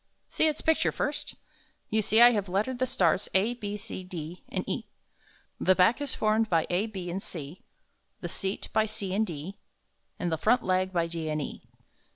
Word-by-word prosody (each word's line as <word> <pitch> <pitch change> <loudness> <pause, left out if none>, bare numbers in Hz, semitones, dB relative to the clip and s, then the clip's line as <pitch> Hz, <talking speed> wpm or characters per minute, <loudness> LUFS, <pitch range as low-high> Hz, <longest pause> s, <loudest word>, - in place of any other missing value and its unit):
See 315 - +2
its 305 - -1
picture 320 0 +2
first. - - -3 0.6
You 220 0 +3
see 220 +3 +5
I 240 - +9
have 205 -4 -1
lettered 215 +7 0
the 255 - +1
stars 185 -1 +2
a, 210 +5 +4
b, 210 -3 -5
c, 185 - -6
d, 175 -1 -7
and - - -3
e. - - -3 0.7
The 185 - +4
back 190 +9 +4
is 285 -2 -2
formed 215 +1 +2
by 165 -2 +3
a, 190 +5 +1
b 185 -5 -5
and 190 +3 -3
c, 165 -4 -8 0.6
the - - -4
seat 195 0 -4
by 220 0 +3
c 200 -3 -3
and 215 +2 +1
d, 170 +4 -6 0.6
and 175 -1 -2
the 160 - -1
front 240 +7 +3
leg 185 0 +1
by 170 -2 +1
d 165 -1 -4
and 155 0 -1
e. 145 - -5
190 Hz, 195 wpm, -28 LUFS, 175-220 Hz, 0.7 s, I